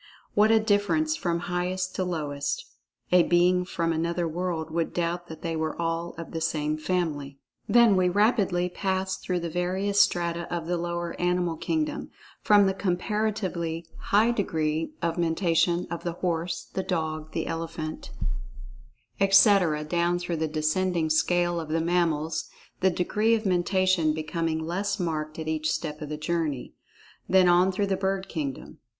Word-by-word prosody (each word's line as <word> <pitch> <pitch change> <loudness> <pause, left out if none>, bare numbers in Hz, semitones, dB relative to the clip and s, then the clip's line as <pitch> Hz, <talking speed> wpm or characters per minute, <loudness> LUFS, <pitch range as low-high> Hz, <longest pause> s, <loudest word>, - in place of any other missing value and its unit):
What 210 +1 +4
a 225 0 +6
difference 220 +10 +1
from 170 - -1
highest 180 +1 -2
to 185 - -1
lowest—a 175 - -2
being 180 +1 +3
from 165 -2 -1
another 170 +1 -1
world 165 -1 -3
would 165 0 -2
doubt 175 0 -1
that 160 -1 -10
they 165 -1 -2
were 160 0 -2
all 165 0 -2
of 165 - -7
the 165 - -4
same 155 -1 0
family. 155 -4 -2 0.3
Then 235 -4 +6
we 185 -1 +3
pass 180 - -5
rapidly 195 -5 +2 0.5
through 180 -1 -1
the 170 - -3
various 190 +4 0
strata 170 -1 0
of 170 -2 -2
the 175 +1 -1
lower 170 0 -3
animal 175 -1 +1
kingdom—from 295 - 0
the 190 - +2
comparatively 185 -3 -2
high 215 +4 +3
degree 160 - -1
of 170 0 0
Mentation 170 +1 +2
of 170 - -4
the 170 - -2
horse, 175 0 -2
the 190 - -1
dog, 160 -4 -3
the - - -2
elephant, 165 -1 -5 1.1
etc., 195 -5 +5
down 170 +2 +1
through 175 -1 -3
the 160 0 0
descending 160 +2 0
scale 175 +2 +2
of 160 -2 -6
the 160 +1 +1
mammals, 165 -2 0 0.3
the 190 - +4
degree 210 +6 +1
of 220 -1 -3
Mentation 185 -3 +2
becoming 160 0 -2
less 200 +4 -2
marked 155 -3 -2
at 160 -1 -5
each 155 0 0
step 155 -1 -3
of 150 - -5
the 150 - -4
journey. 155 -5 -2 0.6
Then 185 -1 +5
on 180 +2 +5
through 200 +2 0
the 195 -1 0
bird 195 0 -1
kingdom. 145 -5 -5
175 Hz, 155 wpm, -27 LUFS, 160-185 Hz, 1.1 s, a